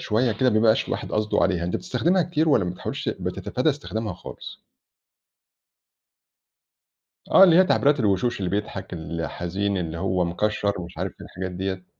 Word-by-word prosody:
شوية 115 +2 +1
كده، 125 +4 +2
ما 110 - -1
بيبقاش 110 0 +3
الواحد - - -4
قصده 105 0 +1
عليها. 90 -3 +1
أنتَ 90 - -1
بتستخدمها 175 +8 +1
كتير، 160 -1 0
والّا 105 -10 +4
ما 90 - -2
بتحاولش 90 - -5
بتتفادى 130 +5 -1
استخدامها 110 -6 -4
خالص؟ - - -10 2.7
آه 195 - +9
اللي 170 -3 +6
هي 185 - +7
تعبيرات 145 -5 +3
الوشوش 105 +3 +1
اللي 90 -3 -2
بيضحك 100 -2 -4
الحزين 85 +4 -3
اللي 85 -1 -4
هو 90 0 0
مكشّر، 100 +2 -1
ومش 85 +1 -9
عارف - - -3
الحاجات 95 0 -6
ديّة. 95 0 -4
100 Hz, 155 wpm, -24 LUFS, 90-125 Hz, 2.7 s, آه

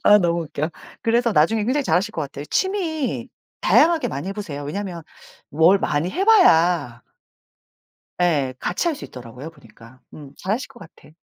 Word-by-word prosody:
아 210 - +7
너무 170 -2 0
웃겨. 155 0 -4 0.3
그래서 235 0 +2
나중에 205 +7 +2
굉장히 270 +5 0
잘하실 180 0 +1
것 160 - -3
같아요. 140 0 -7
취미 335 - -2 0.3
다양하게 320 -6 +4
많이 145 +1 -5
해 - - -3
보세요. 165 -9 -6
왜냐하면 180 +1 -5 0.5
뭘 165 +6 +4
많이 155 0 -1
해 370 +6 -1
봐야 170 - +4 1.2
예. 145 -7 +1
같이 185 - -1
할 330 - 0
수 - - -10
있더라고요, 125 +4 -10
보니까. 125 -4 -18
음. 145 -2 -12
잘하실 215 +9 -3
것 260 -3 -16
같아. 155 -3 -16
175 Hz, 335 characters per minute, -22 LUFS, 145-235 Hz, 1.2 s, 아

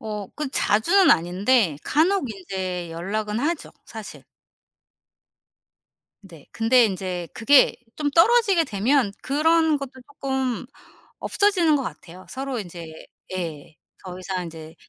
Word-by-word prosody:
어. 210 -3 -5
그 300 -3 -3
자주는 335 - +3
아닌데 180 - +2
간혹 320 - +1
인제 185 -3 -5
연락은 210 +6 -3
하죠, 315 +3 -2
사실. - - -10 2.0
네. 170 -7 -15
근데 235 +1 +4
인제 185 -3 -4
그게 270 +4 +5 0.2
좀 295 -1 -1
떨어지게 390 +1 +4
되면 230 +1 +1
그런 315 +2 +2
것도 275 -2 -7 0.3
쪼끔 265 -3 -2 0.5
없어지는 365 -7 +2
것 275 - -1
같아요. 185 -5 -9
서로 265 -2 -4
인제 170 -4 -9 0.3
예 160 -4 -6 0.3
더 180 0 -7
이상 185 -1 -4
인제 160 -1 -10
220 Hz, 230 characters per minute, -23 LUFS, 180-290 Hz, 2.0 s, 그게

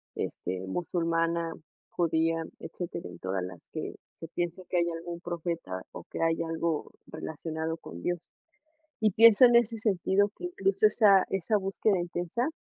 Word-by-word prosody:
este, 90 +1 -3
musulmana, 165 - 0 0.4
judía, 165 -1 +1 0.2
etcétera, 175 - -6
en 85 - -11
todas 95 0 -2
las 90 -2 -9
que, - - -5 0.2
se 165 - -7
piensa 175 +2 -3
que 180 - +1
hay 170 0 +2
algún 170 +1 -5
profeta 170 - -4
o - - -8
que - - -4
hay 165 0 +2
algo 165 -1 -2 0.2
relacionado 160 +1 -4
con 85 - -10
Dios. 175 - -1 0.8
Y 215 -1 +4
pienso 230 +3 +8
en 240 -1 +7
ese 235 -1 +3
sentido 200 -1 +2
que - - -10
incluso 200 - +2
esa 205 -3 +6
esa 195 +3 +1
búsqueda 195 0 +1
intensa, 175 - -2
170 Hz, 150 wpm, -29 LUFS, 165-195 Hz, 0.8 s, pienso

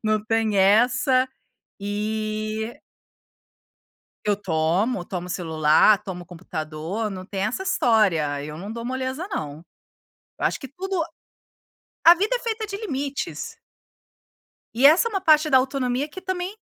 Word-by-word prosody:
Não 215 -1 0
tem 220 -1 +1
essa, 245 +6 +4 0.5
e 215 +2 -3 1.5
eu 205 -1 +2
tomo, 180 +3 0
tomo 180 -1 -5
celular, 160 +3 +4
tomo 180 -2 -6
computador, 170 +4 -5
não 185 -1 -7
tem 195 -1 -4
essa 225 - -2
história, 175 - +2
eu 150 +1 -7
não 200 +6 -7
dou 230 0 -6
moleza 260 +6 -3
não. 155 - -5 0.8
Eu - - 0
acho - - 0
que 270 - -8
tudo 365 +5 -3 1.0
a 335 - +11
vida 410 +8 0
é - - -1
feita 445 -2 -3
de 400 -1 -5
limites. 285 -9 -4 1.2
E 250 +4 +6
essa 325 +10 +6
é - - -12
uma 390 -3 -1
parte 310 -3 +4
da 265 - +7
autonomia 260 +1 -1
que 375 +5 -9
também 375 +2 -4
220 Hz, 135 wpm, -24 LUFS, 190-285 Hz, 1.5 s, a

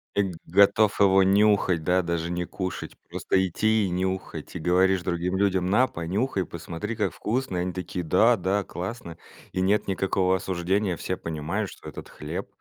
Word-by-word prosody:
Э, 100 - +4
г 95 - -4
готов 100 +3 +4
его 95 -1 +5
нюхать, 100 -3 +3
да, 90 +3 +2
даже 85 -1 -2
не 90 0 -2
кушать, 95 0 -5
просто 95 0 +1
идти 110 +4 +1
и 95 - -2
нюхать. 95 +1 -3
И - - -3
говоришь 90 +3 +3
другим 90 +1 -1
людям: 95 -2 +1
"На, 125 +6 +4
понюхай, 95 +4 -2
посмотри, 85 +7 -6
как 105 - -1
вкусно!" 120 -4 -2
И - - 0
они 90 0 -2
такие: 90 -1 -4
"Да-да, 100 +1 +3
классно." 90 -2 -6 0.3
И 95 - -2
нет 100 +3 +2
никакого 95 -1 +1
осуждения, 95 +1 -1
все 95 - -3
понимают, 85 +6 -3
что - - -11
этот - - -10
хлеб, - - -6
95 Hz, 170 wpm, -26 LUFS, 90-100 Hz, 0.3 s, его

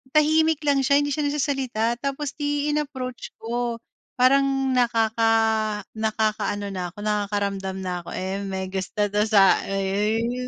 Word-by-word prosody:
tahimik 315 0 +4
lang 280 -1 +4
siya 280 +2 +4
hindi 290 - -2
siya 295 0 0
nagsasalita, 260 -5 -1
tapos, 275 0 -3
'di 290 0 -1
inapproach 260 -5 -4
ko, 235 0 -2 0.4
parang 270 +1 +3
nakaka 225 -2 +2 0.7
nakakaano 215 -2 -1
na 180 -2 -4
ako - - -42
nakakaramdam 200 -2 -1
na 180 -1 -3
ko, - - -6
eh, 190 +1 -3
may 190 -1 -3
gusto 195 +2 -2
'to 210 +1 +1
sa 200 -3 +5
uy, 195 0 -1 0.3
uy, 250 +2 -2
235 Hz, 145 wpm, -24 LUFS, 205-275 Hz, 0.7 s, sa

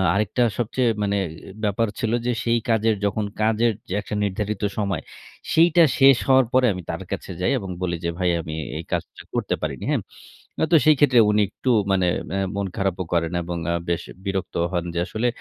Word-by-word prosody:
আরেকটা 105 +4 +1
সবচেয়ে 120 +1 +1
মানে, 100 0 0
এ - - -9 0.3
ব্যাপার 105 +2 +1
ছিল 115 -3 0
যে, 125 - +2
সেই 115 0 +2
কাজের 110 -1 +3
যখন 105 +1 0 0.2
কাজের 110 +1 +2 0.3
একটা 105 - -5
নির্ধারিত 105 +1 -2
সময়, 100 -6 -1 0.5
সেইটা 170 +1 +6 0.2
শেষ 135 -2 +7
হওয়ার 130 -1 +5
পরে 130 0 +5
আমি 90 - -6
তার - - -5
কাছে - - -4
যাই। 95 - +2
এবং 95 -4 -7
বলি 85 -1 -1
যে, - - +1
"ভাই 90 -1 +2
আমি 80 -1 -7 0.2
এই 80 - -5
কাজটা - - -4
করতে - - 0
পারিনি।" - - -4
হ্যাঁ? - - +1 0.6
অ - - +5
তো - - +9
সেই 155 -1 +7
ক্ষেত্রে 130 -5 +5
উনি 105 0 +3
একটু 130 - -4 0.2
মানে 95 -2 +2 0.2
অ্যা 95 - -1 0.2
মন 100 -1 -1
খারাপও 95 -2 -1
করেন। 85 -1 +1
এবং 85 0 -4 0.2
আ - - +1
বেশ 85 0 0 0.2
বিরক্তও 95 -3 -2
হন 85 -1 -1
যে - - +1
আসলে, 110 +4 -1
105 Hz, 195 wpm, -23 LUFS, 95-120 Hz, 0.6 s, তো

